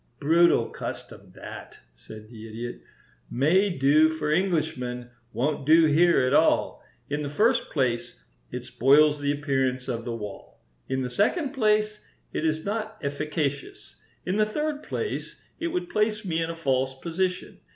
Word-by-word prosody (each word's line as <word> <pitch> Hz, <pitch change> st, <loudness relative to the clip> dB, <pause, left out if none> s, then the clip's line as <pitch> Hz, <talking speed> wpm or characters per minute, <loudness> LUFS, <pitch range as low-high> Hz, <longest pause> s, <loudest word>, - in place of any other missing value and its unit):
"Brutal 165 Hz, -5 st, +4 dB
custom, -, -, -8 dB
that," -, -, -10 dB, 0.2 s
said 105 Hz, -, -12 dB
the 110 Hz, -1 st, -11 dB
Idiot. 115 Hz, +2 st, -7 dB, 0.5 s
"May 175 Hz, +10 st, +3 dB
do 155 Hz, -1 st, +4 dB
for 155 Hz, -1 st, -2 dB
Englishmen; 155 Hz, -9 st, -1 dB, 0.2 s
won't 145 Hz, +3 st, -1 dB
do 160 Hz, +3 st, +6 dB
here 165 Hz, +2 st, +4 dB
at 130 Hz, +1 st, +1 dB
all. 160 Hz, -, +2 dB, 0.2 s
In 145 Hz, +1 st, -2 dB
the 145 Hz, -, -3 dB
first 230 Hz, -, +2 dB
place, 120 Hz, -4 st, -1 dB, 0.3 s
it -, -, -6 dB
spoils 145 Hz, +3 st, +4 dB
the 145 Hz, 0 st, 0 dB
appearance 135 Hz, -3 st, -1 dB
of 115 Hz, -3 st, -3 dB
the 115 Hz, -1 st, -4 dB
wall; 105 Hz, -3 st, -9 dB, 0.3 s
in 130 Hz, 0 st, -1 dB
the 125 Hz, -, -3 dB
second 260 Hz, -, +1 dB
place, 215 Hz, -4 st, +1 dB, 0.3 s
it -, -, -2 dB
is 155 Hz, 0 st, 0 dB
not 215 Hz, +1 st, -3 dB
efficacious; 145 Hz, 0 st, -3 dB, 0.3 s
in 185 Hz, +3 st, -1 dB
the 215 Hz, -, +4 dB
third 300 Hz, +5 st, -2 dB
place, 440 Hz, -, -4 dB, 0.2 s
it 335 Hz, -, -1 dB
would 355 Hz, +1 st, -2 dB
place 215 Hz, -5 st, 0 dB
me 165 Hz, -3 st, -1 dB
in 165 Hz, -, -2 dB
a 165 Hz, -, -4 dB
false 130 Hz, -4 st, 0 dB
position. 180 Hz, +4 st, -3 dB
155 Hz, 155 wpm, -26 LUFS, 130-190 Hz, 0.5 s, do